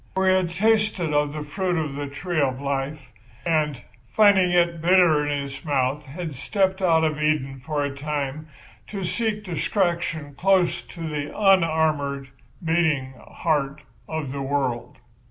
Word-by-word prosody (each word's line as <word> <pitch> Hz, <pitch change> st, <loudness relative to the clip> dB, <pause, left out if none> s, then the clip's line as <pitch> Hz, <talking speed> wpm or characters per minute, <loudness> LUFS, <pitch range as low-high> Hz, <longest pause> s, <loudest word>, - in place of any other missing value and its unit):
For 190 Hz, 0 st, +2 dB
he 185 Hz, -, +6 dB
had 185 Hz, -2 st, +2 dB
tasted 210 Hz, -3 st, +1 dB
of 145 Hz, 0 st, +2 dB
the 150 Hz, 0 st, -5 dB
fruit 180 Hz, +4 st, -1 dB
of 155 Hz, -3 st, -2 dB
the 145 Hz, +1 st, -4 dB
tree 155 Hz, +4 st, -2 dB
of 130 Hz, -2 st, 0 dB
life, 140 Hz, 0 st, -3 dB, 0.3 s
and, 155 Hz, -5 st, +1 dB, 0.3 s
finding 200 Hz, 0 st, +5 dB
it 170 Hz, -2 st, +2 dB
bitter 170 Hz, -3 st, +5 dB
in 145 Hz, -1 st, -1 dB
his 140 Hz, 0 st, -8 dB
mouth, 140 Hz, -1 st, 0 dB
had 155 Hz, +3 st, -6 dB
stepped 190 Hz, -, 0 dB
out 165 Hz, -3 st, +4 dB
of 155 Hz, -1 st, 0 dB
Eden 135 Hz, -4 st, 0 dB
for 150 Hz, +1 st, -1 dB
a 140 Hz, -1 st, -3 dB
time 145 Hz, +1 st, -3 dB, 0.4 s
to 200 Hz, -2 st, -5 dB
seek 210 Hz, +3 st, -1 dB
distraction 170 Hz, -4 st, -1 dB
close 185 Hz, +2 st, +2 dB
to 170 Hz, -, -11 dB
the 150 Hz, -1 st, -3 dB
unarmoured, 160 Hz, -8 st, +2 dB, 0.4 s
beating 160 Hz, -5 st, +1 dB, 0.2 s
heart 150 Hz, -2 st, -1 dB, 0.3 s
of 160 Hz, -4 st, -3 dB
the 140 Hz, 0 st, -4 dB
world. 135 Hz, -3 st, -2 dB
155 Hz, 155 wpm, -24 LUFS, 140-180 Hz, 0.4 s, he